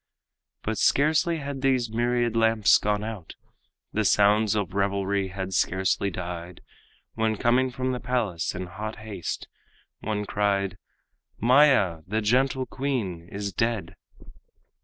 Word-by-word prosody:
But 110 -1 -2
scarcely 155 +3 +3
had 140 -2 -5
these 130 -4 +1
myriad 120 0 0
lamps 115 -2 +4
gone 105 0 0
out, 105 -7 -7 0.6
The 110 - +1
sounds 105 +1 +4
of 100 -3 -2
revelry 100 0 0
had 95 0 -5
scarcely 95 +2 +1
died, 90 -1 -6 0.5
When 110 -1 0
coming 125 +4 +2
from 130 +1 -2
the 125 - -3
palace 110 -13 -1
in 90 0 -4
hot 105 +5 -6
haste, 105 -5 -6 0.5
One 105 -1 -3
cried, 100 -2 0 0.6
"Maya, 125 - +4
the 110 +4 0
gentle 130 +4 +1
queen, 110 -13 -3
is 100 -1 -4
dead." 115 -3 -1
110 Hz, 125 wpm, -26 LUFS, 100-125 Hz, 0.6 s, lamps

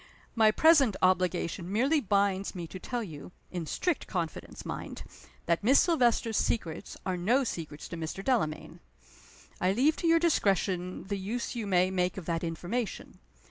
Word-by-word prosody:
My 220 -2 +5
present 275 - +5
obligation 185 -1 +1
merely 265 +9 +3
binds 200 -2 +1
me 175 -2 -4
to 185 +3 -9
tell 240 +4 -3
you 160 -3 -9 0.2
in 175 -3 -4
strict 355 - -1
confidence, 170 -4 -5
mind! - - -6 0.4
that 170 +3 +1
Miss 265 +6 +6
Silvester's 240 - +2
secrets 165 -8 -2
are 185 - 0
no 230 +10 +2
secrets 160 - -5
to 170 - -6
Mr. 165 +4 -5
Delamayn. 220 - -1 0.8
I 185 +1 +3
leave 280 +8 +3
to 340 - -1
your 330 0 +6
discretion 195 - +1
the 200 0 -4
use 230 +7 -3
you 225 -3 -3
may 185 -1 +3
make 180 -1 0
of 185 - -6
that 165 0 -2
information. 180 +8 -4
195 Hz, 160 wpm, -29 LUFS, 175-240 Hz, 0.8 s, Miss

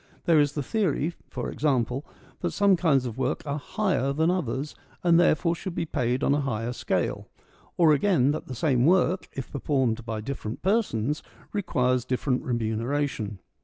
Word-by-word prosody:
There 165 -3 +5
is 145 -1 +2
the 145 - -2
theory, 175 - 0 0.2
for - - -4
example, 130 -2 0 0.4
that - - -1
some 200 -2 +4
kinds 150 -7 +2
of 120 +1 -5
work 130 - -1
are 145 0 -2
higher 185 - 0
than 160 +4 +2
others, 150 -4 -2 0.3
and 170 -1 +5
therefore 170 0 +3
should 170 +1 -6
be - - -1
paid 125 -3 -1
on 140 - +3
a 145 - +1
higher 120 -3 -2
scale. - - -2 0.5
Or 165 -3 +6
again, 145 -4 +3
that 155 - -4
the 130 - -6
same 130 0 +2
work, 185 +1 +3
if 135 - -6
performed 130 -5 0
by 110 -1 -4
different 115 -2 -5
persons, 155 - +1 0.3
requires 125 - +1
different 130 +1 0
remuneration. 115 -1 -2
140 Hz, 165 wpm, -26 LUFS, 125-165 Hz, 0.5 s, Or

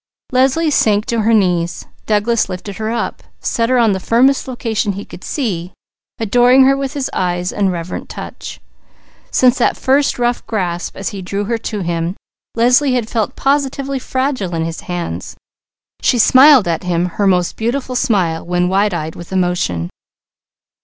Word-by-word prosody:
Leslie 270 +5 +2
sank 210 -5 +2
to 235 -1 -1
her 220 +2 +2
knees. 180 -5 +1 0.2
Douglas 215 +1 +1
lifted 185 +1 -6
her 220 0 -3
up, 235 0 -3 0.2
set 230 -1 -1
her 255 - +3
on 230 -3 +4
the 190 - -1
firmest 255 +8 +2
location 225 -5 -2
he 200 +2 -7
could - - -12
see, 185 - -3 0.4
adoring 245 +4 +4
her 270 +1 +4
with 275 0 -3
his 280 -3 -2
eyes 180 0 -1
and 195 -2 +1
reverent 170 0 -5
touch. - - -8 0.7
Since 255 -1 +3
that - - +2
first 275 +2 +2
rough 240 0 0
grasp 180 -5 -3
as 195 - -3
he 195 - -7
drew 200 +3 -3
her 230 +2 -2
to 210 -2 -4
him, 170 0 -2 0.4
Leslie 250 +3 +3
had 230 -3 -1
felt 220 -3 -1
positively 275 -1 0
fragile 260 -9 -2
in 165 0 -1
his 165 0 -5
hands. 170 - -4 0.7
She 245 - +2
smiled 260 0 +6
at 165 -1 -1
him 175 -1 0
her 195 +3 -1
most 180 -2 +1
beautiful 255 +3 -2
smile 190 -11 +1
when 180 +1 0
wide 195 0 +1
eyed 160 -1 -4
with 175 - -10
emotion. 175 - -1
210 Hz, 165 wpm, -17 LUFS, 180-250 Hz, 0.7 s, smiled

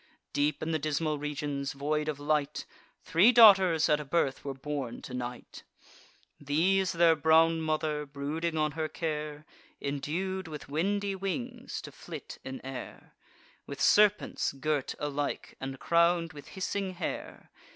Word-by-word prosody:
Deep 145 +1 0
in 160 - -2
the 160 - 0
dismal 155 0 -1
regions 145 -1 -3
void 150 +2 -1
of 150 -2 -2
light, 150 0 0 0.4
Three 185 +9 +5
daughters 190 -9 +7
at 150 - +3
a - - -4
birth 140 -2 0
were 140 -1 -4
born 135 -3 -4
to 125 - -8
Night: 125 -1 -6 0.8
These 175 +7 +2
their 170 -1 +5
brown 160 +1 +4
mother, 155 -1 -1
brooding 155 +4 -3
on 155 -1 +1
her 155 +1 -2
care, 150 -1 -4 0.3
Indued 175 +7 -3
with 150 -2 -8
windy 200 +7 0
wings 240 +6 -4
to - - -8
flit - - -9
in - - -7
air, - - -8 0.5
With - - -7
serpents 210 -6 +3
girt 140 0 -1
alike, 145 -1 -3
and 135 0 -5
crown'd 170 -1 +2
with 145 -2 -11
hissing 190 0 -2
hair. 175 - -6
155 Hz, 140 wpm, -30 LUFS, 145-170 Hz, 0.8 s, daughters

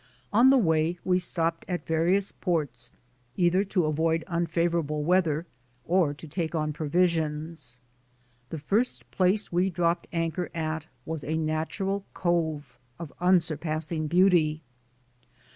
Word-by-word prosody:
On 240 +5 +6
the 270 - +6
way 160 -4 +2
we 185 0 +3
stopped 165 -2 -1
at 180 -2 -3
various 175 +5 +1
ports 145 - -2 0.5
either 180 +2 +3
to 185 -4 +1
avoid 160 +2 +1
un 170 -2 -1
favorable 165 -3 0
weather 165 -2 +2 0.4
or 175 -4 +2
to 145 +3 -10
take 165 +1 -3
on 155 -1 -1
provisions. 155 -4 -1 0.7
The 160 - -5
first 205 - -1
place 195 +3 +1
we 180 +2 +2
dropped 170 -1 0
anchor 165 +1 -2
at 160 -1 -3 0.2
was 160 -2 -4
a 160 +2 -1
natural 160 +6 -2
cove 160 -7 -1 0.2
of 165 -4 -8
unsurpassing 160 -3 +1
beauty. 165 -3 +3
165 Hz, 125 wpm, -27 LUFS, 155-180 Hz, 0.7 s, On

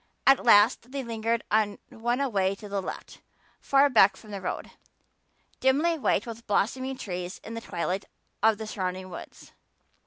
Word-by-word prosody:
At 270 -1 +6
last 230 +2 +5
they 275 -1 -3
lingered 230 0 -1
on 210 -1 +2
one 240 +3 -2
away 200 -8 +1
to 210 - -10
the 200 -1 -2
left, - - -8 0.4
far 275 +1 +4
back 205 -7 +5
from 215 - -14
the 200 -1 -5
road, 185 - -4 0.9
dimly 295 +6 +3
white - - +1
with 230 0 -9
blossoming 260 +6 0
trees 180 -3 -5
in 225 - -8
the 230 - -5
twilight 185 -1 -3 0.4
of 220 -1 +4
the 220 - -6
surrounding 185 -2 -4
woods. - - -10
220 Hz, 160 wpm, -27 LUFS, 195-245 Hz, 0.9 s, At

